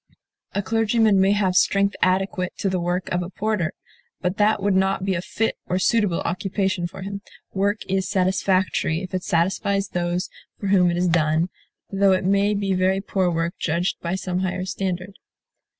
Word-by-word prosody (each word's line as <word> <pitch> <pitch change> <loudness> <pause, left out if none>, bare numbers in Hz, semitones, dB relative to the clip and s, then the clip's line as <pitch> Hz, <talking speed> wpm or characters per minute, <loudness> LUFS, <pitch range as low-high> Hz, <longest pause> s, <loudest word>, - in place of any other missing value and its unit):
A 200 - 0
clergyman 225 -2 +3
may 195 +1 +4
have 195 -3 +1
strength 200 +1 +3
adequate 185 0 +1
to 195 - 0
the 185 -1 -1
work 175 +1 -1
of 180 - 0
a 175 - -5
porter; 200 -4 -1 0.5
but 180 +1 -2
that 210 +1 +3
would 200 0 +1
not 190 0 +1
be 195 - +1
a 170 - -1
fit 225 +4 -2
or 180 - 0
suitable 200 -2 +2
occupation 190 0 -1
for 185 +2 -9
him. 200 +1 -5 0.3
Work 200 +2 0
is 190 0 -1
satisfactory 185 -2 +1
if 185 - -8
it 185 - -1
satisfies 195 +3 0
those 175 +1 -1 0.3
for 200 - -2
whom 185 -3 +4
it 170 - -1
is 180 +1 +1
done, 165 0 +2 0.4
though 195 0 +4
it 185 0 0
may 200 +2 +2
be 200 -1 0
very 185 +1 +2
poor 190 -2 0
work 165 0 -1
judged 170 +3 -1
by 170 +2 -2
some 185 -1 -2
higher 185 0 -2
standard. 190 0 -3
190 Hz, 180 wpm, -23 LUFS, 180-200 Hz, 0.5 s, may